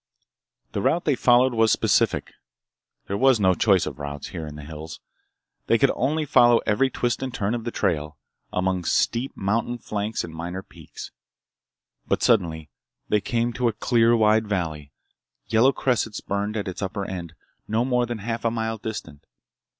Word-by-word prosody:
The 100 - -2
route 170 - +1
they 150 - +3
followed 125 0 +4
was 115 -1 +3
specific. - - +2 0.7
There 100 +1 -3
was 130 -3 +5
no 95 -2 +4
choice 95 -1 +3
of 75 -2 -6
routes, 70 0 -6
here 80 -4 -6
in 75 - -8
the 75 - -9
hills. 80 +1 -8 0.7
They - - +4
could - - +3
only 150 +5 0
follow 120 -3 +5
every 130 +6 +2
twist 120 -2 -1
and 130 -1 -3
turn 105 -1 -1
of 120 -1 -4
the - - -1
trail, 80 -9 -1 0.3
among 90 -1 -1
steep 120 +10 0
mountain 115 +5 -1
flanks 105 -1 -3
and 80 - -8
minor 90 +3 -5
peaks. - - -11 1.0
But - - 0
suddenly 80 -2 +1 0.4
they 105 - +2
came 120 +2 -1
to 125 0 0
a 115 - +1
clear 115 +1 +3
wide 110 0 +3
valley, 80 -7 -3 0.5
yellow 115 +4 +4
cressets 120 -5 -1
burned 100 +2 -3
at 100 - -3
its 95 - -5
upper 100 +1 -3
end, 85 -4 -6 0.3
no 115 +3 +1
more 125 -2 +1
than 120 -1 -3
half 115 +2 -4
a 115 - +2
mile 110 -1 -3
distant. 80 -10 -7
105 Hz, 175 wpm, -24 LUFS, 90-120 Hz, 1.0 s, was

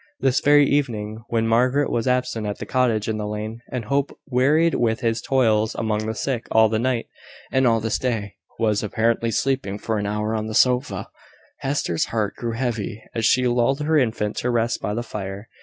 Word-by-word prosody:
This 135 -1 +2
very 145 0 +5
evening, 110 -6 -1
when 115 -1 0
Margaret 125 +5 +2
was 115 +1 -1
absent 125 -4 0
at 105 - -3
the - - -6
cottage 120 -5 +1
in 110 -1 -1
the 105 -1 -3
lane, 110 +2 -5
and 125 -4 -3
Hope, 140 +4 -1
wearied 150 +5 +3
with 115 -1 +1
his 115 -1 0
toils 110 -5 +2
among 110 -1 -1
the 110 - -2
sick 125 -1 -2
all 110 0 +5
the 110 0 0
night, 125 -1 0 0.5
and 130 -1 +3
all 115 -1 +3
this 110 0 -1
day, 110 -6 -2 0.2
was 110 -2 +1
apparently 115 +2 0
sleeping 130 -5 -1
for 110 0 -2
an 100 - -2
hour 105 +1 -1
on 110 -1 -2
the 110 - -4
sofa, 125 +1 +2 0.5
Hester's 135 - -1
heart 110 -3 -1
grew 115 -1 -3
heavy, 115 -3 -3
as 115 -1 +1
she 125 +2 +3
lulled 125 +4 +1
her 155 +2 +1
infant 110 -6 0
to 125 - -1
rest 120 0 0
by 105 - -2
the 120 - -2
fire. 100 -1 -6
115 Hz, 200 wpm, -23 LUFS, 110-125 Hz, 0.5 s, very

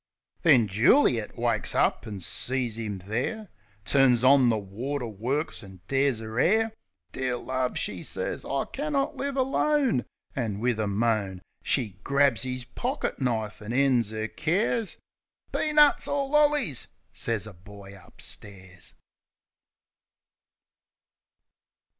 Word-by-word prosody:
Then 135 - +5
Juli 115 - +4
et 105 - -11
wakes - - 0
up - - +1
an' 100 -3 -6
sees 115 +5 -2
'im 105 -3 -4
there. 150 - -3 0.4
Turns 130 -4 +4
on 130 -1 +6
the 110 - +2
water 120 +7 -4
works 125 +8 -3
an' 95 -4 -13
tears 135 -3 +1
'er 110 +1 -5
'air, 220 - +3 0.4
"Dear 130 -2 -2
love," 130 0 -2
she 90 -3 -2
sez, - - -3
"I 135 0 -2
cannot 290 0 -2
live 280 0 -3
alone!" 270 - +1 0.3
An' 110 -6 -2
wif 120 -1 0
a 110 - 0
moan. 100 -3 0 0.2
She 105 -8 -1
grabs 140 -4 +3
'is 125 -1 -4
pockit 245 - -3
knife, 110 -5 -2
an' 105 +3 -5
ends 125 -5 +2
'er 110 0 -3
cares... 200 - -1 0.5
"Peanuts 300 -1 +4
or 280 -1 0
lollies!" 295 - +2 0.3
sez 115 -3 -1
a 110 - -10
boy 100 +2 -13
upstairs. 95 -1 -8
125 Hz, 125 wpm, -27 LUFS, 105-155 Hz, 0.5 s, on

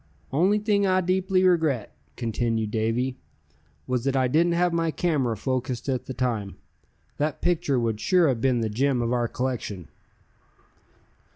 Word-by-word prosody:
"Only 185 +9 +3
thing 205 -1 +1
I 185 0 +3
deeply 185 +1 +1
regret," 160 - +1 0.2
continued 115 -2 -1
Davy, 115 +4 -1 0.7
"was 125 -2 -1
that 135 -1 +1
I 130 -1 +3
didn't 170 +6 +2
have 175 0 +2
my 165 -1 +1
camera 145 -9 0
focussed 130 +1 -3
at 130 -3 -1
the 130 - -4
time. 110 -6 -2 0.6
That 150 +1 -1
picture 165 -7 +1
would 115 -3 -1
sure 180 +3 +3
have 125 -5 0
been 125 -2 +2
the 110 - 0
gem 130 +2 +1
of 120 +1 0
our 120 -1 +1
collection." 115 - -4
130 Hz, 155 wpm, -25 LUFS, 120-170 Hz, 0.7 s, Only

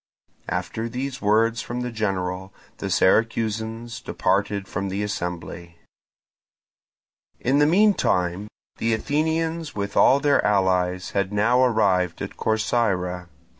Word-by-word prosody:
After 115 +1 -3
these 130 +2 -5
words 110 +2 +2
from 120 +1 -5
the 125 0 -3
general, 95 -3 -3 0.3
the - - -3
Syracusans 115 +2 0
departed 100 +1 -1
from 100 +2 -3
the 100 +2 -2
assembly. 85 -3 -5 1.6
In 135 +3 +2
the 145 - +5
meantime 105 - +2 0.3
the 115 0 +1
Athenians 160 +4 -1
with 100 -1 -4
all 135 - +5
their 140 0 +2
allies 95 -2 +1
had 100 -1 -1
now 115 +5 +3
arrived 95 -7 +2
at - - -6
Corcyra. 95 -5 0
110 Hz, 115 wpm, -23 LUFS, 95-120 Hz, 1.6 s, the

